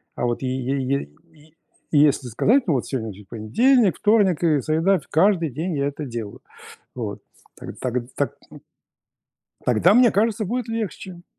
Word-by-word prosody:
А - - -2
вот 120 +1 -2
е 130 - -2
е 135 +2 -2
е 130 - -2 0.2
е 155 0 -21 0.4
если 145 -3 +3
сказать: 230 - +2
"Ну, 160 - +2
вот 125 - -1
сегодня 110 -6 -4
же 105 +2 -14
понедельник, 195 - +2
вторник 205 -6 +2
и 155 -4 +3
среда". 165 +6 +1
Фь - - -19
Каждый 170 -1 +2
день 160 +3 -3
я 140 - 0
это 145 +1 -5
делаю. 115 -5 -7 0.5
Вот. - - -5 0.4
Таг - - -9
таг 125 -1 -3
э, - - +2
так, 140 -4 -1 0.2
м. - - -14 1.1
Тогда, 125 - +4
мне 245 0 +6
кажется, 215 +1 +1
будет 245 +3 -3
легче. 190 -5 -5
155 Hz, 175 wpm, -22 LUFS, 130-200 Hz, 1.1 s, мне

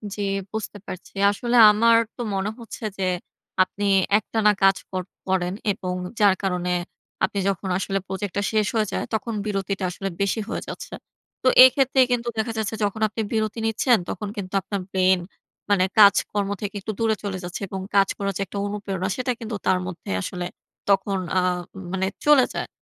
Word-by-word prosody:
জি। 205 - -4 0.3
বুঝতে 220 -1 -5
পারছি। 185 - -8 0.2
আসলে 240 +4 -2 0.2
আমার 230 +2 +5 0.2
তো - - -6
মনে 195 +2 -1
হচ্ছে 230 0 -9
যে, 195 - -2 0.6
আপনি 200 +2 -7 0.3
একটানা 215 0 +2
কাজ 195 0 +6
কর 185 -1 -2 0.2
করেন 185 -1 0 0.2
এবং 185 -2 -4 0.3
যার 200 -2 +5
কারণে 180 -1 -1 0.5
আপনি 200 - +1
যখন 190 0 -3
আসলে 195 +1 -1
প্রজেক্টটা 195 +1 -3
শেষ 215 -2 +2
হয়ে 215 -2 +2
যায়, - - -1
তখন 220 +1 -1
বিরতিটা 195 -1 -2
আসলে 195 +2 -4
বেশি 200 +3 +1
হয়ে - - -3
যাচ্ছে। - - -8 0.5
তো - - +2 0.2
এক্ষেত্রে 265 +1 +3
কিন্তু 240 -1 0
দেখা 230 +1 0
যাচ্ছে 220 0 -2
যখন 205 +1 -1
আপনি 215 +1 -4
বিরতি 220 0 -1
নিচ্ছেন, 235 +2 +3
তখন 210 - -4
কিন্তু 185 -2 -5
আপনার 200 -1 -4
ব্রেইন 185 -1 +3 0.5
মানে 195 -2 +4
কাজকর্ম 200 0 +5
থেকে 205 0 -4
একটু 215 - -4
দূরে 225 -1 +2
চলে 195 -2 -3
যাচ্ছে 180 +3 -6
এবং 190 - -5 0.2
কাজ 195 -1 +5
করার 200 -1 -2
যে - - -4
একটা 195 - -8
অনুপ্রেরণা, 200 -2 -3
সেটা 255 0 -1
কিন্তু 225 -2 -5
তার 185 - +3
মধ্যে 185 - -8
আসলে 180 - -4 0.4
তখন 195 0 +2 0.2
আ - - +6 0.5
মানে 190 0 0 0.2
চলে 295 -4 +6
যায়। - - -3
200 Hz, 175 wpm, -24 LUFS, 190-220 Hz, 0.6 s, কাজ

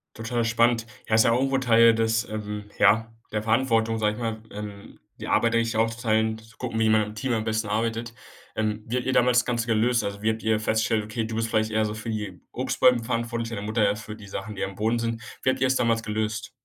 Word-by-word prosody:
Total 115 +1 -2
spannend. 115 0 +2 0.2
Ja, 110 - +3
ist 110 - +5
ja 115 - +4
auch 120 - +3
irgendwo 135 0 +1
Teil 115 -2 +6
des, 115 +1 +1
ähm, 105 -1 -5
ja 115 +1 +4 0.2
der 105 0 -1
Verantwortung, 115 -1 +2
sage 105 -1 +1
ich 105 - -9
mal, 115 -2 -3
ähm, 105 -1 -9 0.2
die - - -6
Arbeit, 115 0 +2
da - - +4
sich 115 0 0
aufzuteilen, 110 -1 +1
zu 110 0 -17
gucken, 115 -3 -3
wie 110 - +3
man 110 0 +4
im 105 +1 -7
Team 130 +2 -1
am 110 -1 0
besten 110 0 -1
arbeitet. 115 +2 -2 0.4
Ähm, 110 0 -2
wie 120 - -2
habt 125 - -1
ihr 130 - +1
damals 125 -1 +4
das - - -1
Ganze 120 -1 -1
gelöst? 115 +2 +2
Also, 100 0 -5
wie 110 - +3
habt 110 0 -2
ihr 110 -1 +1
feststellt: 110 0 +1
Okay, 110 +1 -3
du 110 0 -5
bist 115 0 -1
vielleicht 110 -1 +1
eher 110 0 +2
so 105 0 -2
für 110 +1 -6
die 105 -5 -4
Obstbäume 125 -2 +2
verantwortlich, 115 0 -2
deine 115 -3 -5
Mutter 110 +2 0
eher 105 - +1
für 105 0 -8
die 105 -2 -12
Sachen, 100 +2 -6
die - - -3
am 95 - -4
Boden 115 +2 0
sind. 115 -1 -2 0.2
Wie 130 - +3
habt 130 0 0
ihr 130 - +3
es 130 - +2
damals 115 -2 +2
gelöst? 110 0 -3
110 Hz, 250 wpm, -25 LUFS, 110-115 Hz, 0.4 s, Teil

